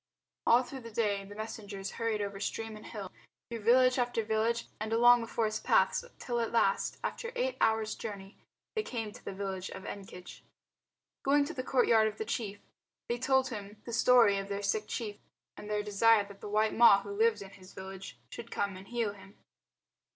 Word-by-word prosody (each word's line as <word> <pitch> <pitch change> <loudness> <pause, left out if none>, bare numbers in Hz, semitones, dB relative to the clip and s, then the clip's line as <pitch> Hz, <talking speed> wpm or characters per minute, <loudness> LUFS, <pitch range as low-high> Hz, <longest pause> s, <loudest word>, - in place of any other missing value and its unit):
All 240 +2 +6
through 265 +2 -8
the 230 -2 -9
day 210 -3 0
the 205 +1 -11
messengers 205 -2 -6
hurried 225 -2 -1
over 200 -1 -5
stream 225 +1 -3
and 215 - -11
hill, 200 -5 -7 0.4
through 230 - -3
village 255 +4 +4
after 240 -2 0
village 220 +2 0
and 215 +1 -4
along 240 +1 +6
the 230 - -5
forest 220 -2 -1
paths - - +3
till 240 -1 -2
at 230 - -1
last, 195 -4 +1
after 470 -1 -3
eight - - 0
hours' 220 -1 +2
journey, 200 -2 -7 0.4
they 435 - +1
came 225 - -4
to 225 - -14
the - - -5
village 190 -1 -4
of 190 - -8
Ekenge. 190 -3 -9 0.8
Going 285 +1 +3
to 330 - -5
the 255 - -3
courtyard 235 -4 +4
of 215 0 -5
the 220 - -3
chief 210 -3 -3 0.5
they 240 0 -1
told 265 0 +2
him 210 -2 -7
the 235 - -6
story 235 -4 +5
of 195 0 -6
their 200 0 -3
sick 210 +1 0
chief, 210 -3 -4 0.4
and 210 - -9
their 210 0 0
desire 210 +1 +4
that 200 -1 -14
the 210 - -6
white 215 +1 +2
Ma 225 -4 +7
who - - -7
lived 445 - +2
in 195 - -12
his 190 -1 -15
village 190 -4 -8
should 235 0 -8
come 200 -3 -2
and 190 +1 -12
heal 235 -4 -1
him. 200 0 -16
220 Hz, 200 wpm, -31 LUFS, 200-235 Hz, 0.8 s, Ma